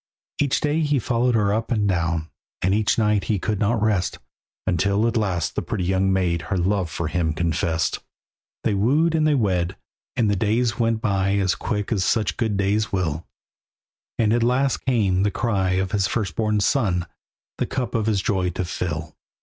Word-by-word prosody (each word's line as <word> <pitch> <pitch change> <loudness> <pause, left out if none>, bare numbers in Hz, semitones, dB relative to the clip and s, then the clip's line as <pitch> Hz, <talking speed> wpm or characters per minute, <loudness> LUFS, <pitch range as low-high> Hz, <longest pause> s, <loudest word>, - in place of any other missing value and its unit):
Each 135 -5 +2
day 150 +1 0
he 150 -2 +1
followed 120 -1 +1
her 105 -2 +2
up 110 +1 -1
and 105 -3 +1
down, 85 -3 -1 0.3
And 95 +1 +3
each 110 +2 +2
night 105 -2 +2
he 105 - +1
could 105 +1 -2
not 110 +1 +1
rest, 105 -4 +1 0.5
Until 100 +4 +1
at 115 - -1
last 95 -8 0
the - - -2
pretty 90 - -3
young 95 +1 +1
maid 90 -3 +1
Her 95 - 0
love 95 0 0
for 80 +1 -3
him 80 -1 0
confessed. 80 0 0 0.6
They 110 - +1
wooed 140 +12 +2
and 155 -1 +2
they 150 - +3
wed, 95 -6 0 0.4
and 115 - +2
the 105 - +2
days 110 +3 0
went 115 -1 +1
by 100 -3 +1
As 95 -2 +2
quick 105 -2 -3
as 100 -5 +1
such 110 0 +1
good 110 -4 0
days 105 +3 +1
will, 85 -4 -2 0.9
And 110 -1 +2
at 120 - +2
last 125 +3 +2
came 100 -7 +2
the 105 - +2
cry 100 -4 0
of 95 0 0
his 100 -2 +1
firstborn 105 0 -1
son 95 -8 +1 0.5
The - - 0
cup 125 -2 -3
of 110 -3 0
his 100 -3 +1
joy 95 -3 0
to 90 +1 -3
fill. 80 -3 -4
100 Hz, 190 wpm, -23 LUFS, 90-115 Hz, 0.9 s, And